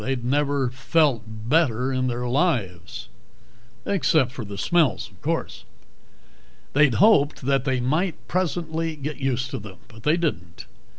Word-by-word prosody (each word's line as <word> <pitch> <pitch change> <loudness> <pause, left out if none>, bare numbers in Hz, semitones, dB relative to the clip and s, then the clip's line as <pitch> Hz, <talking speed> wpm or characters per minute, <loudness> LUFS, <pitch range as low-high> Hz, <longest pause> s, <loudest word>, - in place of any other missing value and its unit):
They'd 130 -2 -3
never 140 -1 +1
felt 130 -3 +1
better 125 +3 0
in 130 0 0
their 125 0 -2
lives. 120 - -1 0.8
Except 155 -9 +2
for 130 - -6
the 100 -1 -8
smells, 155 - +1
of - - -23
course. - - -3 1.1
They'd 145 -3 +4
hoped 195 -9 +4
that 135 0 0
they 130 -2 +1
might, 155 +8 0
presently, 165 -3 -2
get 150 +1 -5
used 130 -1 -2
to 135 - -3
them. 100 -3 -11 0.2
They 150 +8 +2
didn't. 90 - -3
135 Hz, 135 wpm, -24 LUFS, 120-155 Hz, 1.1 s, They'd